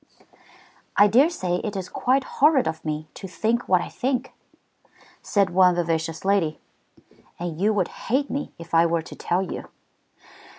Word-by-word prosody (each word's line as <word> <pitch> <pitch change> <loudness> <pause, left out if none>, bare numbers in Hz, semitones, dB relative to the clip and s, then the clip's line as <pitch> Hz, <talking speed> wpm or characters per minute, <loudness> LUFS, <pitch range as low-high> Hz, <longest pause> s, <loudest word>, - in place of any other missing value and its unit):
"I 205 - +8
dare 255 +10 +5
say 180 - -2
it 210 +2 -4
is 190 -2 -4
quite 265 +2 +1
horrid 280 0 +3
of 160 0 -4
me 155 0 -4
to 195 - -8
think 225 +6 -1
what 185 -2 +4
I - - -6
think," 260 0 -2 0.9
said 200 -3 +1
one 180 0 +5
vivacious 165 -1 -2
lady, 190 -6 +1 0.8
"and 170 -1 -5
you 210 +2 +3
would 200 -4 0 0.2
hate 275 +4 +1
me 285 - -3
if 170 0 -12
I 165 +1 +5
were 165 -1 0
to - - -10
tell 180 +2 -1
you." - - -7
190 Hz, 165 wpm, -24 LUFS, 170-235 Hz, 0.9 s, I